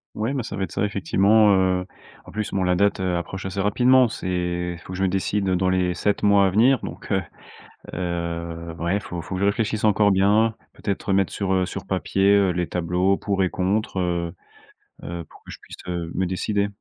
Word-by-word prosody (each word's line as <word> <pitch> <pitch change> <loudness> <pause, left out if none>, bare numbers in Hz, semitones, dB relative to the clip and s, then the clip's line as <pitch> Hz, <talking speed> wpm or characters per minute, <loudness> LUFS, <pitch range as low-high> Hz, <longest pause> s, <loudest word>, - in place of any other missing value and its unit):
Ouais, 110 +5 -1
mais 135 - -1
ça - - -6
va 95 - -2
être 90 - -4
ça, 85 - -1
effectivement, 105 +1 +3
heu, 95 -1 +2 0.4
en - - -12
plus, 110 -1 -3
bon, 95 - 0
la 90 0 +2
date, 100 +1 +2
heu, 90 -1 0
approche 95 +3 -5
assez 95 +1 -2
rapidement, 125 +5 +4
c'est 90 -3 -2
il - - -9
faut 90 - -10
que - - -5
je 95 - -1
me 95 - +2
décide 100 +2 -1
dans 95 0 +1
les 90 -1 +1
7 100 +5 -1
mois 100 -1 +5
à - - +2
venir, 120 +7 +4
donc, - - -8
heu, 95 - +2 0.7
heu, 85 -1 -4
ouais, 85 +4 0
faut 90 -3 -6
faut 95 - -5
que 90 - -3
je - - +3
réfléchisse 105 +1 0
encore 105 -1 +4
bien, 105 +4 +3 0.2
peut-être, 100 -1 -2
mettre 95 -1 +1
sur, 100 -2 -2
heu, 95 -1 +2
sur - - -6
papier, 95 +1 +1
heu, 100 -2 +3
les 90 -1 -2
tableaux 90 +3 +1
pour 100 -2 0
et 90 - +1
contre, 95 +1 -1
heu 85 -1 -1 0.7
heu, 85 -1 -5
pour - - -18
que - - -11
je - - -10
puisse, - - -12
heu, 85 -2 -4
me 95 - 0
décider. 100 +3 -1
95 Hz, 220 wpm, -23 LUFS, 90-100 Hz, 0.7 s, mois